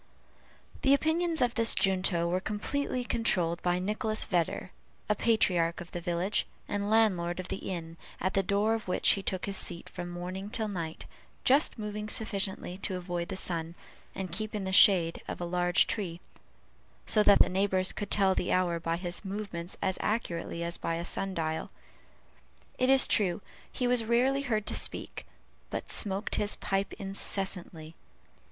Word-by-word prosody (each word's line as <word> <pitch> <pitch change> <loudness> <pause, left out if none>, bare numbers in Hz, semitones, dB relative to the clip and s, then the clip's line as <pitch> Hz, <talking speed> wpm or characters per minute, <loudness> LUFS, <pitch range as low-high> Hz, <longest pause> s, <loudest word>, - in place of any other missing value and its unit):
The 275 +1 +5
opinions 320 +2 +1
of 240 -1 +1
this 230 -2 +5
junto 185 -3 +2
were 180 +2 0
completely 250 +6 -2
controlled 180 -8 0
by 175 0 +1
Nicholas 215 +3 +1
Vedder, 175 0 -1 0.4
a 210 - +3
patriarch 180 -7 +1
of 175 - -9
the 175 - -5
village, 175 +3 0 0.2
and 205 0 -2
landlord 190 -6 +2
of 185 - -6
the - - -5
inn, 165 -2 -6 0.2
at 185 +1 -1
the 195 - +3
door 200 +3 +1
of 225 -3 -4
which 180 - +2
he 200 - +3
took 185 -1 -3
his 195 -1 -1
seat 170 -1 -3
from 175 -1 -7
morning 180 +3 -6
till 220 -1 -2
night, 170 -5 -5 0.4
just 275 +1 +3
moving 210 0 -5
sufficiently 195 -4 0
to 190 -1 -2
avoid 175 -1 -4
the 195 - -5
sun, 170 -2 -1 0.4
and 190 -3 -5
keep 215 +4 -3
in 205 - -3
the 190 - -3
shade 175 -4 +6
of - - -5
a 175 - -3
large 175 0 +2
tree; 180 -6 -3 0.9
so 215 - +3
that 205 - +6
the - - +5
neighbors 190 0 +1
could 205 -1 -5
tell 195 -2 +3
the 180 - -1
hour 175 -2 +1
by 165 0 -2
his 175 +1 -4
movements 190 -3 -5
as 190 -1 0
accurately 170 -6 -2
as 170 0 -2
by 165 - -2
a 170 +1 -4
sun 195 +2 -2
dial. 160 -1 -2 1.1
It 255 - +2
is 270 -1 +6
true, 185 -4 +3 0.3
he 250 - -2
was 245 -1 +2
rarely 250 +5 +2
heard 220 -6 -1
to - - 0
speak, - - -1 0.4
but - - -5
smoked 200 0 +1
his 210 0 +1
pipe 195 0 -2
incessantly. 195 -5 -4
190 Hz, 175 wpm, -29 LUFS, 175-215 Hz, 1.1 s, shade